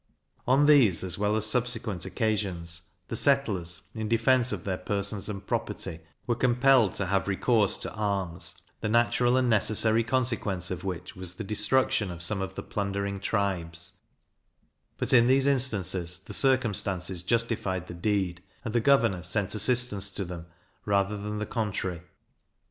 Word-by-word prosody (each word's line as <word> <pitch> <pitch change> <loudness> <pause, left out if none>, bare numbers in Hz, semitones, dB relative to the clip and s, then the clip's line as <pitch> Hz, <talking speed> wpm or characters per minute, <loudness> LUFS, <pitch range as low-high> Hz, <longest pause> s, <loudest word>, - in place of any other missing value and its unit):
On 135 +3 +4
these 125 - +5
as 95 0 0
well 105 +1 +1
as 110 -1 +2
subsequent 110 -5 0
occasions, 95 -7 -2 0.3
the - - -3
settlers, 105 - +1
in 110 -1 -4
defence 120 +2 +2
of 100 -4 -5
their 95 -2 -3
persons 100 +2 -3
and 100 -2 -7
property, 80 - -4 0.3
were 120 - 0
compelled 125 -2 +3
to 95 - -2
have 95 +1 -1
recourse 105 +1 +1
to - - -6
arms, 100 -5 -2 0.2
the 105 - -3
natural 120 +2 +2
and 130 -1 +1
necessary 110 0 +3
consequence 115 -8 -1
of 90 -1 -5
which 90 -3 -6
was 90 -1 -6
the 110 - -6
destruction 105 +1 +1
of 85 -1 0
some 95 +2 +4
of 95 0 -5
the - - -6
plundering 100 -1 -3
tribes; 90 -5 -3 1.0
but, - - -1
in 120 -1 +6
these 135 +1 +3
instances, 95 -10 0
the - - -7
circumstances 100 -9 +1
justified 100 -3 -2
the 90 - -9
deed, 90 -1 -2 0.2
and 110 - -4
the 120 - +2
governor 115 -8 +2
sent 95 +3 0
assistance 105 -3 +5
to 100 0 -4
them, 85 -1 -8 0.4
rather 100 0 0
than 105 +1 -5
the 105 - -3
contrary. 95 -7 -3
105 Hz, 155 wpm, -27 LUFS, 95-115 Hz, 1.0 s, in